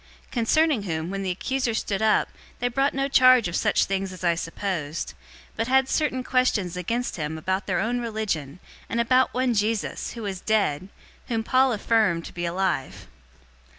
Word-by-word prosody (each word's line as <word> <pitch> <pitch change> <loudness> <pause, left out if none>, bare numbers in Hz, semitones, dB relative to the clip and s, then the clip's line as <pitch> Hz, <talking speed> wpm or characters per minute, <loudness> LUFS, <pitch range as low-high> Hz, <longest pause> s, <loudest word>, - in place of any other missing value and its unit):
025:018 - - -30
Concerning 270 +2 +2
whom, 165 -2 -3
when 195 0 -3
the 190 - -2
accusers 235 +5 -1
stood 200 0 -2
up, 220 -1 +3 0.3
they 245 - 0
brought 270 +3 0
no 275 0 0
charge 255 -5 +6
of 175 - -4
such - - +2
things 195 -1 -2
as 185 0 -10
I 170 -1 +3
supposed; 165 -2 -3
025:019 - - -11 0.4
but 225 +1 -1
had 265 +1 +3
certain 265 -4 0
questions 245 -9 +1
against 230 +7 -2
him 155 0 -3
about 185 +5 -2
their 185 -3 0
own 235 +5 0
religion, 205 - -3 0.3
and 230 - -1
about 255 +2 +3
one 255 -1 +1
Jesus, 215 0 -1
who 230 - -7
was 190 -3 -4
dead, 195 -5 0 0.4
whom 225 -2 -1
Paul 260 +3 +3
affirmed 210 -6 +1
to - - -9
be 175 0 -3
alive. 175 -6 -2
215 Hz, 185 wpm, -25 LUFS, 180-245 Hz, 0.4 s, charge